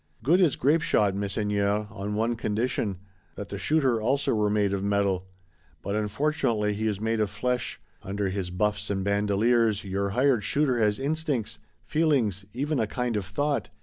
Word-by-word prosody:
Good 170 - +4
is 165 -7 +4
grapeshot, 135 -8 +2
Messeigneurs, 100 +1 0
on 100 0 -4
one 115 +2 0
condition: 110 -2 -1 0.4
that 100 - -7
the 100 - -5
shooter 135 -6 +2
also 135 +5 +1
were 105 -2 +2
made 105 -1 +1
of 100 -1 -2
metal! 100 -2 0 0.6
But 100 - -3
unfortunately 110 -1 0
he 110 +2 -2
is 105 -3 -1
made 110 +1 0
of 105 -2 +1
flesh; 125 +4 -2 0.2
under 100 0 -2
his 95 -1 -3
buffs 105 +3 -1
and 95 -1 -1
bandoleers 105 +2 +2
your 100 0 -2
hired 130 -5 +3
shooter 135 +1 +1
has 105 -2 +2
instincts, 140 -6 -2 0.3
feelings, 130 - +1
even 140 +4 -1
a 110 - +1
kind 125 0 -2
of 100 -3 -1
thought. 145 +8 -1
105 Hz, 165 wpm, -27 LUFS, 100-125 Hz, 0.6 s, Good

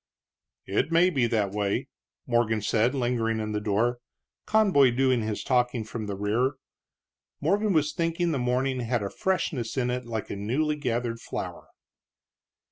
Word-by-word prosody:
"It - - 0
may 175 +2 +5
be 130 -7 +2
that 105 -4 0
way," 100 -1 -1 0.4
Morgan 115 -3 +1
said, 115 +5 +2
lingering 120 -3 0
in 110 0 -3
the 105 0 -2
door, 110 +4 +1 0.5
Conboy 195 -12 +5
doing 130 -2 +3
his 110 -1 -3
talking 125 -2 +1
from 110 0 -6
the 100 - -3
rear. 110 +7 +1 0.9
Morgan 200 +7 +1
was 155 -3 +2
thinking 170 +1 0
the 140 - -1
morning 125 +1 0
had 120 -2 -1
a 100 - -4
freshness 150 -11 -1
in 125 -1 +1
it 125 -1 -3
like 110 -3 -4
a - - -3
newly 130 +10 0
gathered 120 -4 -2
flower. - - -6
125 Hz, 155 wpm, -27 LUFS, 110-140 Hz, 0.9 s, may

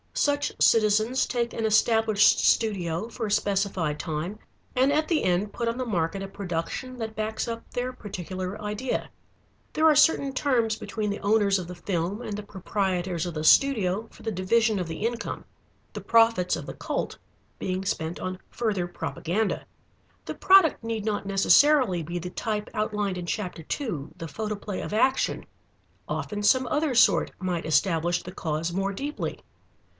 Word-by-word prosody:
Such 290 0 +1
citizens 220 +3 +3
take 235 -1 -2
an 225 - -2
established 220 -1 +4
studio 185 -4 +1
for 230 -1 -4
a - - -4
specified 195 -7 0
time 160 +7 -4 0.4
and 260 +2 +4
at 310 +1 +1
the 330 -3 +1
end 185 +3 0
put 235 - -2
on 230 +1 -1
the 255 - -2
market 185 -3 -1
a - - -5
production 195 +6 -4
that 220 -2 -5
backs 215 +1 -2
up 230 0 -4
their 250 +1 -3
particular 185 -4 -6
idea. 210 +5 -3 0.6
There 315 - +2
are 310 -1 +6
certain 290 -2 +4
terms 245 -5 +1
between 215 -1 -3
the 200 - -4
owners 200 -2 +3
of 180 - -6
the 180 - -7
film 180 +3 -2
and 220 -4 -4
the 210 - -5
proprietors 190 -3 -2
of 175 -2 -5
the 155 - -3
studio 215 - +4
for - - -16
the 225 - -2
division 215 +3 +2
of 180 - -3
the 165 +6 -4
income, 235 0 -3 0.5
the - - -6
profits 225 -5 +3
of - - -6
the - - -6
cult - - -3 0.4
being 185 +1 -3
spent 160 -1 -2
on 185 0 -4
further 205 -7 -1
propaganda. 180 +4 -2 0.6
The - - -5
product 375 -10 +5
need 225 -2 -3
not 210 -2 -1
necessarily 200 - +4
be 170 +3 -4
the 180 +1 -6
type 210 0 -3
outlined 210 -3 -1
in 175 - -6
chapter 180 -4 -4
two, 165 - -4
The 165 - -6
Photoplay 210 +3 -4
of - - -5
Action. 260 +5 +1 0.6
Often 205 -1 -3
some 255 +4 +4
other 295 -2 0
sort 235 - +4
might 180 -3 -2
establish 175 +1 +1
the 180 - -8
cause 165 -1 -2
more 195 +2 -1
deeply. 285 +9 -4
205 Hz, 170 wpm, -26 LUFS, 180-230 Hz, 0.6 s, are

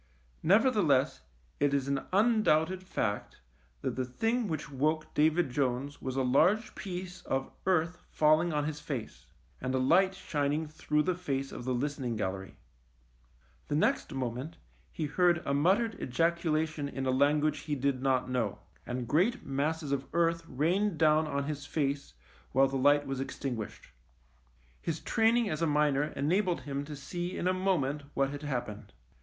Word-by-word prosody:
Nevertheless 180 - +3 0.4
it 145 0 +2
is 135 -1 0
an 140 -1 -1
undoubted 190 -5 +3
fact 110 - -3 0.4
that - - -2
the 130 - -1
thing 225 - -1
which 155 -4 -4
woke 155 +3 0
David 155 -1 +2
Jones 135 +2 -1
was 130 -1 -4
a 135 - +1
large 180 - +3
piece 185 -1 -6
of 135 0 -1 0.2
earth 180 -1 +1
fall 155 +1 +4
ing 175 0 -1
on 150 -1 0
his 150 -1 -3
face, 135 -7 -6 0.3
and 130 +1 -1
a - - +2
light 180 +9 +4
shining 150 -2 -1
through 150 0 0
the 185 - +1
face 140 -6 -3
of 120 - -7
the 130 - 0
listening 135 -2 -2
gallery. 95 -2 -4 1.1
The 145 - -1
next 155 - +1
moment 130 +4 -4 0.3
he 155 - -3
heard 170 +3 +2
a 140 - 0
muttered 195 +10 +2
ejaculation 160 0 0
in 135 -1 -4
a 130 - +2
language 145 +3 +2
he 150 -1 -3
did 135 -1 0
not 130 -2 +1
know, 125 -5 -1 0.3
and 125 -1 -3
great 180 - +1
masses 145 +2 -1
of 135 -1 -1
earth 170 0 +2
rained 175 +7 +1
down 155 0 +4
on 140 -1 -1
his 145 0 -5
face 140 - -2 0.4
while 135 +1 +5
the 135 - -4
light 145 +2 +4
was 135 -1 -3
extinguished. 125 -4 -5 0.9
His 165 -1 -2
training 230 0 +2
as 155 -4 -2
a 165 - +3
miner 150 -1 +2
enabled 175 +5 +1
him 140 0 -4
to 150 0 -7
see 175 +6 -5
in 180 - -1
a 185 - +3
moment 170 -7 0
what 135 0 +1
had 145 0 -6
happened. 125 -8 -4
150 Hz, 165 wpm, -31 LUFS, 135-170 Hz, 1.1 s, while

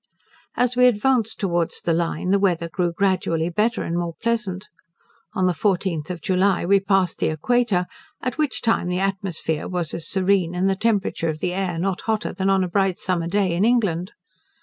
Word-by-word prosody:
As 245 0 +1
we 250 0 +6
advanced 240 0 +1
towards 175 -4 -1
the 170 - 0
Line, 170 +2 -1
the 200 - +4
weather 175 -4 +1
grew 175 +1 -1
gradually 175 -3 0
better 215 +6 0
and 170 - -3
more 170 -1 -2
pleasant. 210 -4 -2 0.7
On 185 - +1
the 180 - +2
14th 180 -4 -1
of 175 -3 -5
July 190 -1 +2
we 200 +2 +4
passed 195 -2 +1
the - - +1
Equator, 195 +3 +1 0.3
at 255 -1 -3
which 300 -4 -1
time 225 -6 +1
the 180 0 -1
atmosphere 190 -5 -2
was 175 -3 -3
as 165 - -4
serene, 190 -3 +1
and 185 +2 +1
the 195 - +2
temperature 200 -5 0
of 155 - -3
the 180 0 -1
air 185 -3 -2
not 185 +2 -1
hotter 220 -1 -1
than 190 0 -1
in 195 -1 +3
a - - -1
bright 190 0 +1
summer 175 -3 -1
day 190 -1 +1
in 175 +3 +1
England. 205 -7 +1
190 Hz, 195 wpm, -22 LUFS, 175-205 Hz, 0.7 s, we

